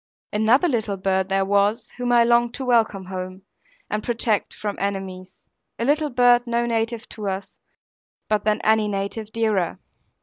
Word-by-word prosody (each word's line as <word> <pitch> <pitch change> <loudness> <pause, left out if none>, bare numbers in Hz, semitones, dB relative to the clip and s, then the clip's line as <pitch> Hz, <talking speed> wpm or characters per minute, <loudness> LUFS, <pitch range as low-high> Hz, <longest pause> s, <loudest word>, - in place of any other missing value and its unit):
Another 225 +10 +4
little 220 - -1
bird 190 0 0
there 195 0 +2
was, 200 +2 +1
whom 245 -1 -1
I 240 -1 +6
longed 235 0 +2
to 265 - -5
welcome 220 -6 +2
home, 185 0 -6 0.4
and 210 - -2
protect 225 -3 0
from 205 -1 -5
enemies, 190 -2 -5 0.3
a 230 - -1
little 300 +2 +2
bird 245 -1 +4
no 235 0 0
native 230 0 -2
to 210 -2 -6
us, 190 0 -5 0.7
but 215 -1 +1
than 215 0 +1
any 220 -1 +3
native 205 +2 -4
dearer. 215 -7 0
215 Hz, 160 wpm, -23 LUFS, 195-235 Hz, 0.7 s, I